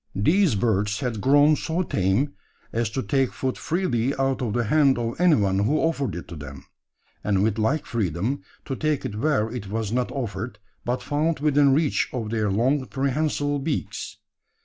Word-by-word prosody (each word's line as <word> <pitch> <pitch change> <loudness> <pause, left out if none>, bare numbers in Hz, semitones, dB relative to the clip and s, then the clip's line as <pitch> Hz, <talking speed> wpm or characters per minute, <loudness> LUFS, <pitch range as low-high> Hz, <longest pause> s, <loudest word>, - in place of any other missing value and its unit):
These 160 - +3
birds 105 -1 0
had 115 -5 -2
grown 145 +4 +5
so 165 +4 -1
tame, 110 - 0 0.4
as 115 -1 0
to 130 +4 -3
take 135 -3 +1
food 130 -1 -2
freely 140 -7 0
out 135 -1 0
of 115 -5 -1
the 120 - +1
hand 140 +3 +3
of 120 +6 -3
anyone 105 - +4
who 110 +10 +2
offered 145 - 0
it 85 - -7
to 85 - -7
them; 70 -3 -9 0.6
and 100 -1 +2
with 110 0 0
like 140 +8 +1
freedom, 110 - -1 0.2
to 135 - -3
take 155 0 -1
it - - -3
where 110 -3 +1
it 120 -5 -5
was 110 +1 -3
not 125 +1 0
offered, 120 -3 -4 0.3
but 125 +1 -2
found 150 +1 0
within 145 -1 +4
reach 150 -1 +1
of 115 -4 -3
their 110 -2 0
long 130 +8 +2
prehensile 145 +4 0
beaks. 115 -8 -3
125 Hz, 175 wpm, -24 LUFS, 105-145 Hz, 0.6 s, grown